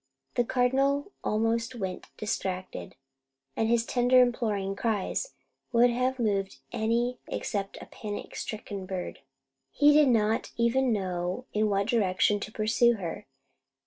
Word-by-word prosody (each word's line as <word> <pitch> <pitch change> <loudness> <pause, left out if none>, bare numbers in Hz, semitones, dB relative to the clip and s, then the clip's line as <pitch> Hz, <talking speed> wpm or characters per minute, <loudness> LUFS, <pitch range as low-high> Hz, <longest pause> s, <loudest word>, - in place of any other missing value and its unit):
The 245 - +2
Cardinal 270 - +1
almost 225 +3 0
went 190 -5 -5
distracted; 185 -3 -4 0.6
and 225 - +1
his 235 -1 +3
tender 250 +1 +4
imploring 220 -6 +1
cries 220 - -2 0.4
would 240 0 +5
have 255 +2 0
moved 200 -5 -1
any 235 +3 0
except 195 -1 -3
a - - -9
panic 205 -1 -7
stricken 200 -3 -5
bird. 185 -2 -5 0.5
He 295 0 +5
did 300 -1 +6
not 225 -2 +1
even 240 +2 +2
know 185 +1 -2
in 215 0 +2
what 200 0 +1
direction 205 -3 +2
to 215 - -6
pursue 225 +2 +3
her. 175 -9 -6
225 Hz, 130 wpm, -28 LUFS, 200-245 Hz, 0.6 s, did